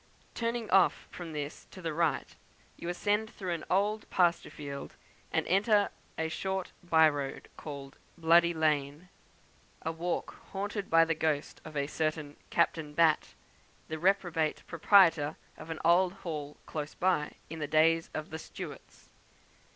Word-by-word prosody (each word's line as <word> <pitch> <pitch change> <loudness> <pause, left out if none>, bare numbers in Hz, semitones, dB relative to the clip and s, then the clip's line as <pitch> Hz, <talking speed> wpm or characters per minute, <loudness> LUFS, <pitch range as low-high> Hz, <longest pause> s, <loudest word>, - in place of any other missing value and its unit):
Turning 230 -1 -2
off 190 -1 +4
from 175 -2 -7
this 150 -1 -5
to - - -12
the 165 -3 -3
right, 160 -3 0 0.4
you 170 - -6
ascend 210 +4 0
through 185 -6 -4
an 165 - -4
old 210 +3 +1
pasture 175 -2 +2
field, 140 -2 -7 0.4
and - - +1
enter 205 +2 +3 0.3
a 160 - 0
short 190 +3 -3
by 160 -2 +6
road, 145 -2 -3
called 140 -2 -8 0.2
the - - -19
"Bloody 170 +1 +6
Lane" 155 +1 0 0.7
a 160 - -1
walk 170 +2 -3 0.2
haunted 200 0 -3
by 165 0 +6
the 165 - +1
ghost 155 -2 -1
of 155 -2 -7
a 140 - +1
certain 155 -1 -2
Captain 160 -3 +1
Batt, 160 -1 +3 0.5
the 160 0 -4
reprobate 175 -4 +1
proprietor 165 -3 +4 0.2
of 160 - -11
an 160 - -3
old 175 +2 +5
hall 150 -3 -4
close 150 -1 -5
by, 180 -5 +1
in 160 +1 -7
the 150 - -2
days 165 +2 +3
of 155 +1 -4
the 160 - -5
Stuarts. - - -10
165 Hz, 150 wpm, -31 LUFS, 155-180 Hz, 0.7 s, by